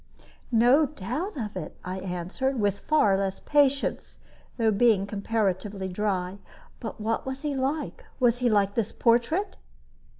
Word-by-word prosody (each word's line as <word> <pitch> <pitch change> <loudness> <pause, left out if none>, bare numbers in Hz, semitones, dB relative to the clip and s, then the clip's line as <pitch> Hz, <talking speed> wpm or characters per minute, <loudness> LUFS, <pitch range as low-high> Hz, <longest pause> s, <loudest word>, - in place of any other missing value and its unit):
"No 245 +6 +5
doubt 295 - -4
of 215 -6 -4
it," 180 -5 -6
I 185 +1 -4
answered, 190 +9 -2
with 200 -1 +1
far 255 -11 +3
less 195 0 -1
patience, 280 -2 +1 0.4
though 225 -2 +3
being 210 -2 +3
comparatively 200 -2 -2
dry. 190 -1 -2 0.4
"But 225 -2 -6
what 225 +1 -1
was 265 +1 -5
he 295 -1 -1
like? 275 +3 -2 0.2
Was 245 -1 +3
he 250 -1 +2
like 200 -2 +2
this 225 -1 -1
portrait?" 245 - +1
225 Hz, 140 wpm, -27 LUFS, 195-265 Hz, 0.4 s, No